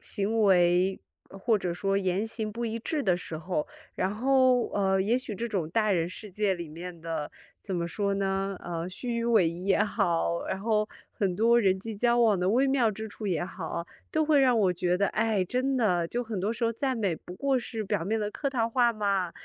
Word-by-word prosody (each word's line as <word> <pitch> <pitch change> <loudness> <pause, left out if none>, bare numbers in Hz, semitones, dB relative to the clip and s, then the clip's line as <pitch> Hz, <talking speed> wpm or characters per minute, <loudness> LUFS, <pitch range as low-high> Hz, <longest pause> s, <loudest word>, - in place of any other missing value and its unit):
行 220 +2 -1
为 180 -1 +4 0.3
或 210 +3 0
者 180 -3 -2
说 195 +2 0
言 190 +2 0
行 220 -1 -2
不 235 +3 -4
一 230 0 -2
致 295 +6 -2
的 185 -7 +3
时 165 -2 -6
候。 160 -1 -2 0.3
然 190 +2 -1
后， 255 +1 +3
呃， 195 -1 +1
也 225 +6 +2
许 230 -5 -6
这 235 +4 -3
种 190 -8 -2
大 215 +3 +1
人 170 -2 +1
世 205 +3 -9
界 200 0 0
里 170 -3 -7
面 170 +2 -8
的 160 -2 -4 0.3
怎 190 -3 -3
么 170 0 -1
说 200 +3 -1
呢？ 195 0 -1
呃， 170 0 -4
虚 235 +6 -4
与 230 - -1
委 225 -7 +4
蛇 165 - -2
也 190 +4 +1
好， 170 -4 0
然 190 - -2
后 215 0 +1 0.2
很 185 -3 -1
多 235 +2 +4
人 190 -2 +2
际 220 +3 -5
交 240 +3 +2
往 220 -5 +4
的 180 - +1
微 255 +6 +3
妙 260 -5 +3
之 220 +2 -6
处 215 0 -7
也 175 -3 0
好， 170 -2 -5 0.2
都 315 0 +1
会 295 -2 +4
让 250 -3 +4
我 190 -4 +3
觉 180 0 0
得， 200 +1 +1
哎， 215 -4 +1
真 255 +7 0
的， 180 -8 +1
就 245 +4 -2
很 215 -5 -4
多 205 - 0
时 230 0 -2
候 230 - +1
赞 260 +2 -1
美 200 -6 0
不 180 +3 -11
过 275 +4 +1
是 225 -2 -5
表 200 -3 -1
面 220 +3 0
的 210 0 -2
客 280 +6 -2
套 235 -4 0
话 240 0 +3
嘛， 200 -4 0
205 Hz, 245 characters per minute, -28 LUFS, 180-230 Hz, 0.3 s, 为